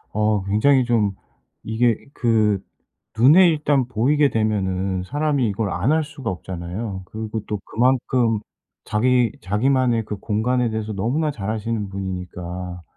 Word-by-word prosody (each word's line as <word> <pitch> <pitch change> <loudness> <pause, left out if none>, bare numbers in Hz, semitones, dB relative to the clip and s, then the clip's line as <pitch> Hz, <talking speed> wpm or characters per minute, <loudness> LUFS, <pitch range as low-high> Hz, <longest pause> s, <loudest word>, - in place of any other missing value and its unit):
어 105 -1 +1
굉장히 125 +7 +3
좀 110 -5 +1 0.5
이게 115 +1 +1 0.2
그 110 -4 +2 0.6
눈에 160 +10 +7
일단 145 -5 +1
보이게 140 +5 +2
되면은 95 -4 -1
사람이 145 +2 0
이걸 100 0 -2
안 110 - +1
할 160 0 +2
수가 145 -7 -5
없잖아요. 95 +3 -5
그리고 110 0 -5
또 105 - -3
그만큼 120 -2 +1 0.4
자기 120 +1 +2
자기만의 120 +4 +1
그 105 - -5
공간에 115 +4 0
대해서 110 -1 -3
너무나 130 +11 0
잘 105 -6 -4
아시는 110 -1 -2
분이니까 90 -2 -6
110 Hz, 285 characters per minute, -22 LUFS, 100-125 Hz, 0.6 s, 눈에